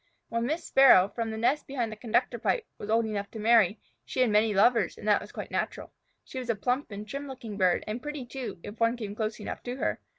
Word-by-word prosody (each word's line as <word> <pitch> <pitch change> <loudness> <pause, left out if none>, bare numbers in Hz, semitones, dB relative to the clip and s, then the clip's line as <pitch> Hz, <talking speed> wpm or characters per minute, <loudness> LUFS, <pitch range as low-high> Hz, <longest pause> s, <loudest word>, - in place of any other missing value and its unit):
When 230 +1 -1
Miss 315 +4 -2
Sparrow, 245 -8 +7
from 230 0 -3
the 220 - -4
nest 260 +6 +1
behind 245 -5 -2
the - - -6
conductor 235 +2 0
pipe, 455 - 0
was 205 - -7
old 225 +1 +3
enough 205 -2 -3
to 220 - -8
marry, 215 -2 +4 0.2
she - - -2
had 245 -4 +3
many 210 +1 +4
lovers, 220 +4 +3
and - - -8
that - - +4
was - - -10
quite - - -7
natural. - - -3 0.3
She 260 - -7
was 250 -2 -7
a 230 - +2
plump 250 +7 -1
and 205 0 -7
trim 280 +5 -5
looking 240 -6 -7
bird, 185 -3 +2
and 215 +3 -4
pretty, 295 -3 -5
too, 250 -3 -6
if 205 - -9
one 230 +1 +2
came 210 -4 -5
close 215 +1 -3
enough 210 - -6
to 245 0 -5
her. - - -1
230 Hz, 250 wpm, -28 LUFS, 215-255 Hz, 0.3 s, Sparrow